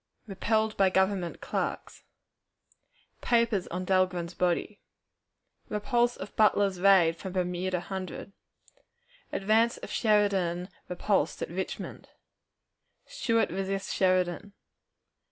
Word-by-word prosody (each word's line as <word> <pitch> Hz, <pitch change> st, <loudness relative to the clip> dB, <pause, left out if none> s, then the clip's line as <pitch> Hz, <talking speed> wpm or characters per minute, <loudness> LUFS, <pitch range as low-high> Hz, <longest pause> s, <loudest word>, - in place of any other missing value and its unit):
Repelled 220 Hz, +2 st, 0 dB
by 195 Hz, -1 st, +4 dB
Government 190 Hz, -2 st, 0 dB
Clerks. -, -, -4 dB, 1.2 s
Papers 230 Hz, -5 st, +1 dB
on 180 Hz, +2 st, -4 dB
Dahlgren's 185 Hz, -2 st, +1 dB
Body. 180 Hz, +4 st, -1 dB, 0.9 s
Repulse 240 Hz, +3 st, +1 dB
of 195 Hz, -, -8 dB
Butler's 200 Hz, -3 st, +3 dB
Raid 180 Hz, -4 st, +5 dB
from 190 Hz, +1 st, -7 dB
Bermuda 180 Hz, 0 st, -1 dB
Hundred. 190 Hz, +1 st, -6 dB, 1.0 s
Advance 220 Hz, +4 st, +2 dB
of -, -, -9 dB
Sheridan 195 Hz, -5 st, +1 dB, 0.2 s
repulsed 180 Hz, -2 st, 0 dB
at -, -, -6 dB
Richmond. 190 Hz, +2 st, -5 dB, 1.0 s
Stuart 230 Hz, -, 0 dB
resists 195 Hz, +1 st, -3 dB
Sheridan. 185 Hz, +1 st, +1 dB
190 Hz, 95 wpm, -28 LUFS, 180-210 Hz, 1.2 s, Raid